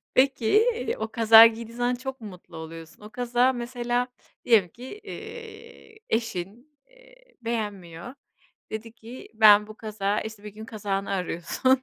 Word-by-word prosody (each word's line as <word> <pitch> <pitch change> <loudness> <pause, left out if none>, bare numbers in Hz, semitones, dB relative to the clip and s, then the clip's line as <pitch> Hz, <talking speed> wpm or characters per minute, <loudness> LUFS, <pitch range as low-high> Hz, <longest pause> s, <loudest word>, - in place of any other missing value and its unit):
Peki 270 - +4 0.3
o 220 - -3
kazağı 225 -1 +9
giydiğin 230 +1 -7
zaman 245 +1 +1
çok 265 0 -7
mu 215 - -7
mutlu 180 -3 -13
oluyorsun? 160 +2 -10
O 210 - -10
kazağı 245 +2 +2
mesela 245 0 -2 0.4
diyelim 210 -7 +4
ki, 245 +8 -12 0.2
eee, 450 0 -10
eşin, 230 - -4
eee, - - -21 0.3
beğenmiyor, 210 -3 -5 0.6
dedi 220 +1 -6
ki: 235 +2 -11
"Ben 210 -1 +7
bu 215 - -11
kazağı" 210 -2 -2
işte 220 -2 -8
bir 210 - -7
gün 220 +1 -9
kazağını 200 -3 -3
arıyorsun, 195 +8 0
225 Hz, 140 wpm, -26 LUFS, 210-250 Hz, 0.6 s, kazağı